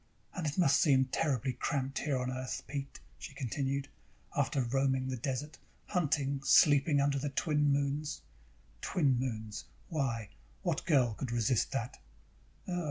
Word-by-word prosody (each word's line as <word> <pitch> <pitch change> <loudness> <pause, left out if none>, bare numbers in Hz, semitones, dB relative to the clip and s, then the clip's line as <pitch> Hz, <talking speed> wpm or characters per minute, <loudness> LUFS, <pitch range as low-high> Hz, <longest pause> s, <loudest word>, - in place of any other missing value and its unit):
"And 175 -5 -3
it 145 - -3
must 165 -7 +4
seem 135 -4 +5
terribly 130 -2 0
cramped 135 0 -2
here 145 -3 0
on 125 0 -2
Earth, 130 0 -4
Pete," 140 0 -5 0.2
she 135 - -9
continued. 135 +1 -2 0.5
"After 135 - +1
roaming 130 +1 +1
the 130 - -1
desert, 135 +5 -4 0.3
hunting, 145 -6 0
sleeping 145 +1 +5
under 140 0 +2
the 145 +2 -2
twin 145 +1 +1
moons. 140 +2 -1 0.6
Two 180 - -2
moons! 120 -6 0 0.2
Why, 130 - -1 0.3
what - - -1
girl 130 -8 +4
could 120 +3 -5
resist 120 0 +1
that?" 125 -2 -3
135 Hz, 140 wpm, -32 LUFS, 130-145 Hz, 0.6 s, seem